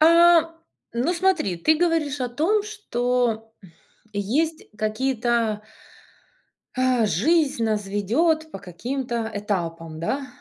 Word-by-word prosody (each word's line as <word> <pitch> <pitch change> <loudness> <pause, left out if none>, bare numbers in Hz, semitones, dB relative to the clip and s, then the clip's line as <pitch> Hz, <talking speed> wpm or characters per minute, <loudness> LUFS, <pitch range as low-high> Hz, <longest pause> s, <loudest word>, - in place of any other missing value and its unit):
А, 335 0 +6 0.4
ну, 250 +9 0
смотри, 340 - +1
ты 310 - +3
говоришь 315 -5 0
о 250 - 0
том, 345 - +1
что 245 - -1 0.6
есть 285 +11 -1
какие-то 225 -1 0 1.1
Э, 255 -3 +2
жизнь 275 - +2
нас 215 -2 -1
ведет 310 - +1
по - - -7
каким-то 235 +5 -4
этапам, 165 -6 -3
да. 270 +11 -2
250 Hz, 105 wpm, -24 LUFS, 215-315 Hz, 1.1 s, А